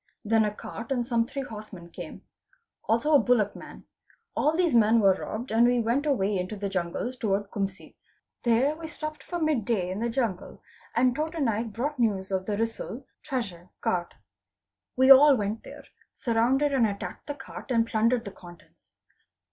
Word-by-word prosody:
Then 220 +1 +3
a 210 - 0
cart 225 +3 -8
and 245 -3 0
some 235 -2 +1
three 275 +1 -4
horsemen 210 -7 -10
came; 175 -3 -9 0.6
also 255 +8 +2
a 290 - +8
bullock 225 -6 +2
man: - - -11 0.5
all 310 +2 +2
these 350 -5 +2
men 230 0 +5
were 195 -3 +5
robbed, 220 +5 -6
and 230 +2 +5
we 245 0 +3
went 240 +6 0
away 205 -8 +1
into 185 +4 -4
the 200 -1 -3
jungles 185 +7 -3
towards 205 -4 -1
Kumsi. 195 -2 -4 0.5
There 250 +5 +2
we 325 0 -7
stopped 305 -1 -6
for 350 - -5
mid 310 -8 +1
day 195 -5 -1
in 190 - -4
the 235 +1 -1
jungle 230 -6 -3 0.3
and 245 +1 +3
'Tota 315 +3 -3
Naik 225 -4 0
brought 270 +6 -3
news 200 -5 0
of 190 0 -1
the 205 -1 -1
risal 225 +3 -3 0.2
(treasure) 200 - -4
cart. 175 -1 -1 0.8
We 260 +1 +6
all 280 +1 +9
went 210 +1 -2
there, - - -11 0.3
surrounded 255 +5 +1
and 245 -5 +4
attacked 200 -1 -6
the 290 - -4
cart 265 0 -10
and 230 -3 +3
plundered 230 +1 +1
the 200 - -6
contents. 175 -3 -16
230 Hz, 180 wpm, -27 LUFS, 205-265 Hz, 0.8 s, all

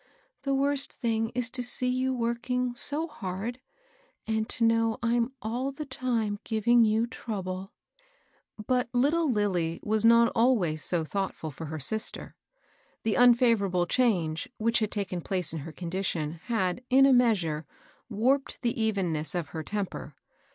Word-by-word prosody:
The 275 0 0
worst 280 0 +1
thing 225 -2 -1
is 250 -1 0
to 250 - -2
see 245 +1 -2
you 255 +1 +1
working 245 +1 -1
so 295 +6 -2
hard, 215 - -5 0.7
and 220 0 -1
to 235 - 0
know 225 0 +3
I'm 235 +1 +1
all 245 +5 -2
the 300 +2 -6
time 235 -6 -1
giving 230 +2 +3
you 220 +1 +2
trouble." 195 -5 -5 0.9
But 250 -1 0
httle 290 +5 +2
Lillie 180 -7 0
was 215 0 +1
not 235 0 +6
always 210 - +2
so 165 0 0
thoughtftd 180 -4 -3
for 160 - -7
her 155 +1 -5
sister. 220 +10 -2 0.7
The 220 - +1
unfavorable 230 -7 +4
change, 175 -8 +1
which 230 +2 +2
had 215 -2 0
taken 190 -4 -3
place 180 -2 -2
in 160 - -3
her 155 +3 -7
condition 170 -2 -3
had, 220 -1 -1
in 270 +2 +6
a 275 - +6
measure, 185 -11 +2 0.4
warped 265 +7 0
the 235 -1 0
evenness 180 -8 0
of 175 -3 -2
her 160 - -5
temper. 200 +3 -4
225 Hz, 150 wpm, -28 LUFS, 185-245 Hz, 0.9 s, not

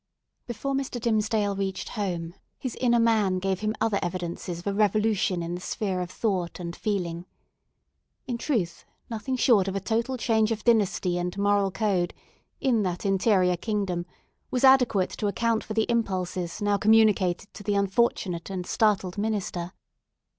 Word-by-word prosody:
Before 245 +4 -3
Mr. 270 -2 -2
Dimmesdale 215 -3 +1
reached 195 -1 -3
home, 175 -6 -3 0.2
his 255 -3 -4
inner 240 -2 +4
man 215 -5 +3
gave 190 0 -1
him 215 +1 -1
other 215 -3 +1
evidences 175 -1 -4
of 175 - -11
a 200 - 0
revolution 210 -3 +1
in 170 +1 -4
the 175 - -5
sphere 190 -1 -2
of 180 - -4
thought 185 -4 -2
and 170 -1 -5
feeling. 180 -4 -3 1.0
In 240 -2 -3
truth, 215 - -1 0.3
nothing 230 +4 -2
short 225 -6 +4
of 195 - -2
a - - 0
total 230 +6 -1
change 220 -2 +2
of 220 -1 -2
dynasty 200 -6 +2
and 180 +2 -3
moral 200 -1 +2
code, 190 -3 0 0.4
in 245 -5 +2
that 180 0 -2
interior 190 -2 +3
kingdom, 190 -4 -2 0.4
was 250 - -1
adequate 250 -8 +5
to 210 - 0
account 225 +2 0
for 215 - -6
the 220 - +2
impulses 185 -6 -2
now 205 0 +2
communicated 205 -3 +3
to - - -10
the 205 0 -1
unfortunate 200 -3 0
and 185 -2 -4
startled 200 -3 +1
minister. 200 -5 -2
200 Hz, 160 wpm, -26 LUFS, 180-225 Hz, 1.0 s, adequate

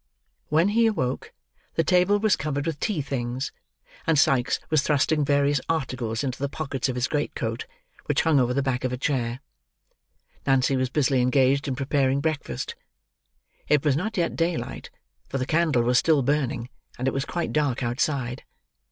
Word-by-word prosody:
When 160 +5 +3
he 230 +2 +4
awoke, 130 - -2 0.4
the 165 - +2
table 180 +4 +4
was 215 -1 +3
covered 145 0 -3
with 160 -3 -3
tea 195 -8 -1
things, 125 -1 -3 0.6
and 160 -2 +3
Sikes 130 -3 +3
was 155 -3 +4
thrusting 150 +1 +2
various 140 -1 +2
articles 130 -7 -1
into 130 -2 -3
the 140 0 -1
pockets 140 -3 -3
of 125 - -2
his 125 0 0
great 150 +2 -2
coat, - - -3 0.4
which - - +2
hung 160 -4 +4
over 125 -1 +2
the 140 +2 0
back 130 -2 -1
of 130 - 0
a 125 - -2
chair. 125 -2 -1 1.1
Nancy 135 0 +3
was 130 -1 0
busily 135 -2 +2
engaged 135 +2 +3
in 135 - -1
preparing 135 0 +1
breakfast. 155 0 -3 0.9
It 150 0 +3
was 145 -3 +3
not 205 +8 -2
yet 170 -2 0
daylight; 165 -7 -2 0.4
for 135 - -2
the 130 - -1
candle 155 -5 +2
was 125 +1 +4
still 155 -4 +3
burning, 130 -3 0 0.3
and 125 - -2
it 135 - +1
was 135 - -1
quite 170 +3 -3
dark 140 -4 0
outside. 125 +1 -1
140 Hz, 175 wpm, -25 LUFS, 130-155 Hz, 1.1 s, he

